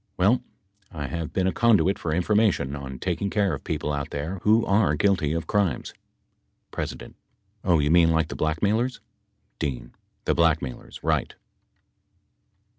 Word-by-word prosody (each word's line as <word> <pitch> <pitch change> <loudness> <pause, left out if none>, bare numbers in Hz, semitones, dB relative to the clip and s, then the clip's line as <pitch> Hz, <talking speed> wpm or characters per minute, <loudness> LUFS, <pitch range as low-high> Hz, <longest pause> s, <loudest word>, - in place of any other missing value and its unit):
Well, 110 +7 +3 0.5
I 75 -5 -5
have 85 +1 -4
been 95 - 0
a 95 - +2
conduit 105 -4 +3
for 80 - -3
information 90 -5 +1
on 65 -2 -7
taking 95 +5 -2
care 100 -3 +1
of 70 - -5
people 75 -1 -2
out 70 +1 -3
there 80 +7 -4
who 110 +2 +4
are 100 -7 +3
guilty 85 -3 +2
of 85 -1 -2
crimes. 95 -7 0 0.8
P. - - -2 0.8
Oh, 90 -3 +3
you 75 0 +1
mean 85 -1 +6
like 80 0 +1
the - - -5
blackmailers? 105 +11 0 0.6
D. 65 -4 -3 0.4
The - - +2
blackmailers. 80 -7 0
Eight. - - 0
85 Hz, 145 wpm, -25 LUFS, 75-100 Hz, 0.8 s, mean